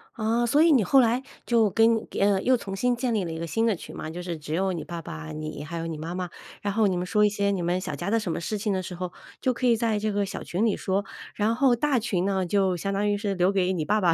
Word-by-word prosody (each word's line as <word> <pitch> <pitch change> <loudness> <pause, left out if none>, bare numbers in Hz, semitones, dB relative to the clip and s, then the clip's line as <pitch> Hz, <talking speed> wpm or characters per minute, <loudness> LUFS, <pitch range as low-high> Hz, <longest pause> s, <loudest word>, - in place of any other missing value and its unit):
啊， 230 +1 +1
所 285 +6 +3
以 330 0 +6
你 255 -7 +5
后 270 +9 +5
来 245 +2 +3 0.2
就 225 -4 +3
跟 225 +1 +3
呃， 200 -1 +3
又 255 - +4
重 200 -5 -5
新 245 +5 +1
建 240 -1 -1
立 205 - +1
了 170 - -4
一 160 - -5
个 170 - -4
新 225 +7 0
的 225 - +2
群 - - -10
嘛， 155 - -5
就 175 +2 -6
是 175 -2 -4
只 150 0 -6
有 190 +3 +1
你 170 -3 -4
爸 170 -1 -6
爸， 80 - -7
你， 75 - -6
还 165 +3 -6
有 165 - -3
你 160 -2 -4
妈 165 +3 -5
妈， 180 -1 -3 0.3
然 200 - -1
后 220 +2 +2
你 190 -2 +2
们 175 - -1
说 210 +3 +3
一 - - +4
些 200 0 0
你 195 -3 -1
们 175 +2 0
小 150 - -4
家 195 - -3
的 230 - +3
什 195 -6 -3
么 - - -2
事 170 +6 -3
情 210 +1 -1
的 190 -1 -1
时 180 - -6
候， 180 0 -4 0.3
就 255 - +2
可 255 - -3
以 240 -2 +5
在 225 -1 0
这 215 +1 -1
个 205 0 0
小 195 - -6
群 190 +6 -1
里 215 - 0
说。 195 +1 0 0.3
然 215 +2 +1
后 255 0 +4
大 280 +2 +1
群 200 -6 0
呢， 190 -2 0
就 190 0 +1
相 195 +4 -2
当 205 +1 +1
于 205 - +1
是 205 -1 -2
留 180 0 +2
给 190 -1 +1
你 170 -4 -1
爸 215 +7 +2
爸 175 -3 +4
200 Hz, 330 characters per minute, -26 LUFS, 175-225 Hz, 0.3 s, 以